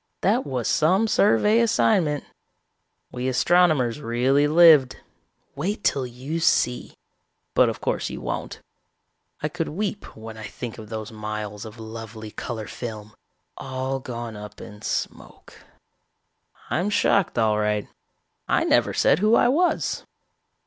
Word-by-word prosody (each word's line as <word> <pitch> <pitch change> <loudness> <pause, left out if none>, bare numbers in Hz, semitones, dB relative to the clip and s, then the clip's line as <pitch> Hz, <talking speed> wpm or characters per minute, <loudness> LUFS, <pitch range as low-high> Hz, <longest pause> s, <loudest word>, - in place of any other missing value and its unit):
"That 225 +7 +1
was 125 -3 -2
some 185 +8 +3
survey 210 +1 +3
assignment. 190 -9 +2 0.9
We 125 +1 -3
astronomers 150 -2 +3
really 130 +4 +2
lived. 155 -5 +6 0.6
Wait 195 +9 -3
till 135 -2 +1
you 130 +7 -5
see 125 -6 +1 0.6
but - - +4
of - - -6
course - - -1
you - - -6
won't. - - -5 0.8
I - - 0
could - - -3
weep 200 - -4
when 110 0 -9
I 110 -1 -7
think 115 +3 -7
of 110 -1 -10
those 110 -1 -6
miles 105 -1 -5
of 110 +1 -11
lovely 110 -1 -8
color 110 0 -5
film, 110 -3 -7 0.4
all 130 0 -3
gone 120 -3 -6
up 105 0 -10
in 105 -1 -11
smoke. - - -5 1.2
"I'm 180 +5 0
shocked 200 -5 +2
all 110 -2 +2
right. 105 -1 0 0.6
I - - +2
never - - +2
said - - +3
who 215 +3 +4
I 240 - +4
was. 345 +7 +1
125 Hz, 135 wpm, -24 LUFS, 110-170 Hz, 1.2 s, lived